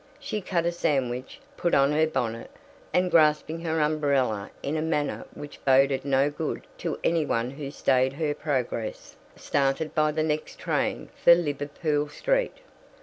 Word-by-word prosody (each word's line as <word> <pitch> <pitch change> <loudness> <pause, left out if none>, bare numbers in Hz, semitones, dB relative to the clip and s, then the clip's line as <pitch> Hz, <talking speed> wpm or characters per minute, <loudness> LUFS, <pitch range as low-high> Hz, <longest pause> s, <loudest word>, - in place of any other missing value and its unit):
She 275 -7 -4
cut 175 -3 -1
a 170 - +2
sandwich, 130 - -1 0.2
put 175 - +1
on 140 +1 +4
her 155 +1 +3
bonnet, 115 -6 -3 0.4
and, 180 0 +2
grasping 155 0 +3
her 160 -1 -1
umbrella 140 -9 +1
in 145 - -2
a 155 - 0
manner 155 -2 -1
which 145 0 -10
boded 135 0 +4
no 140 +1 +2
good 150 +1 -4
to 170 -2 -3
any 165 -1 +2
one 120 -3 -1
who 140 0 -6
stayed 130 -2 +2
her 150 0 -1
progress, 130 -7 -3 0.2
started 140 +2 0
by 155 0 +2
the 155 +1 0
next 155 0 -2
train - - -1
for 170 - +9
Liverpool 145 -1 -1
Street. - - -1
150 Hz, 155 wpm, -26 LUFS, 135-160 Hz, 0.4 s, for